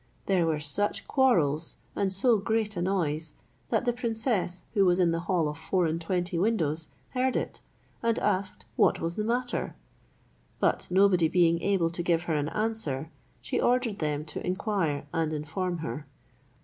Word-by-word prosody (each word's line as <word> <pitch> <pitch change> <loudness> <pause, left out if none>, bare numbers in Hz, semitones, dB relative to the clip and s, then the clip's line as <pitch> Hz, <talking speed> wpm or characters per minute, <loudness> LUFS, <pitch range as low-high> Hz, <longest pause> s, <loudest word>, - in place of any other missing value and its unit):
There 180 -4 +2
were 160 -2 +1
such 150 +8 -1
quarrels, 165 - +2 0.2
and 195 -1 +1
so 220 +5 +4
great 215 +1 0
a 175 - -2
noise, 160 -5 -1 0.4
that 225 +1 +1
the 240 - +2
princess, 225 -6 -1
who 200 -3 +4
was 180 -1 +4
in 175 -2 +3
the 165 - 0
hall 175 -5 +2
of 150 +1 -5
four 180 +2 +1
and 165 +1 -1
twenty 175 0 -1
windows, 165 -7 0 0.2
heard 255 0 0
it, - - -3 0.4
and 230 -1 +1
asked 190 0 -1
what - - +3
was 165 +1 -2
the 215 - -1
matter; 245 +3 -1 0.8
but - - +1
nobody 185 -2 +4
being 170 0 +3
able 180 -4 +1
to 175 - -3
give 170 -1 +1
her 170 - -1
an 150 0 0
answer, 165 -8 -2 0.3
she - - -1
ordered 245 -4 +1
them 150 -1 -1
to 150 - -6
inquire 180 -6 -1
and 160 -1 0
inform 170 +4 -2
her. 150 -2 -5
180 Hz, 170 wpm, -28 LUFS, 160-210 Hz, 0.8 s, so